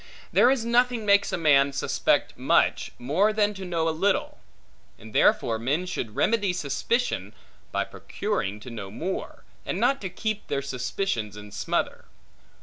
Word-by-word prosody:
There 245 Hz, -, +6 dB
is 260 Hz, -4 st, +1 dB
nothing 240 Hz, -1 st, +2 dB
makes 200 Hz, 0 st, +4 dB
a -, -, -1 dB
man 140 Hz, -4 st, +4 dB
suspect 135 Hz, -, +1 dB
much, -, -, +2 dB
more 165 Hz, -, +2 dB
than 210 Hz, -1 st, +1 dB
to 195 Hz, -1 st, -8 dB
know 170 Hz, -3 st, -1 dB
little; 170 Hz, +5 st, 0 dB, 0.6 s
and 110 Hz, -1 st, -13 dB
therefore 115 Hz, -1 st, +3 dB
men 145 Hz, +10 st, 0 dB
should 120 Hz, -, -4 dB
remedy 205 Hz, -5 st, +2 dB
suspicion, 230 Hz, -, -1 dB, 0.4 s
by -, -, 0 dB
procuring 105 Hz, -, -3 dB
to 125 Hz, -, -9 dB
know 105 Hz, -4 st, -6 dB
more, 175 Hz, -, -5 dB, 0.2 s
and -, -, -3 dB
not 275 Hz, 0 st, +2 dB
to 190 Hz, -, -3 dB
keep 215 Hz, +3 st, -3 dB
their 140 Hz, -1 st, -1 dB
suspicions 125 Hz, -, -3 dB
in 105 Hz, 0 st, -10 dB
smother. 100 Hz, -, -2 dB
175 Hz, 150 wpm, -26 LUFS, 125-210 Hz, 0.6 s, There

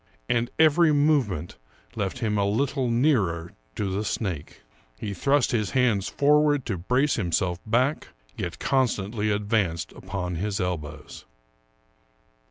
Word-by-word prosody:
And 120 Hz, 0 st, +1 dB
every 160 Hz, +1 st, +5 dB
movement 140 Hz, -, +1 dB, 0.4 s
left 105 Hz, +1 st, -2 dB
him 110 Hz, -4 st, -1 dB
a -, -, +2 dB
little 130 Hz, +3 st, 0 dB
nearer 105 Hz, -, +1 dB, 0.2 s
to 100 Hz, -2 st, -2 dB
the 100 Hz, +3 st, -1 dB
snake. 95 Hz, -9 st, -4 dB, 0.4 s
He 105 Hz, -2 st, -4 dB
thrust 140 Hz, +9 st, +2 dB
his 110 Hz, -5 st, 0 dB
hands 115 Hz, -6 st, +2 dB
forward 145 Hz, -1 st, +3 dB
to 100 Hz, -6 st, -3 dB
brace 125 Hz, -, +1 dB
himself 90 Hz, -2 st, 0 dB
back, 130 Hz, +7 st, +1 dB, 0.3 s
yet 85 Hz, -1 st, -4 dB
con 135 Hz, -2 st, +2 dB
stantly 105 Hz, 0 st, -2 dB
advanced 100 Hz, -5 st, 0 dB
upon 90 Hz, -3 st, -5 dB
his 100 Hz, +3 st, -2 dB
elbows. 85 Hz, -5 st, -5 dB
105 Hz, 130 wpm, -25 LUFS, 95-135 Hz, 0.4 s, every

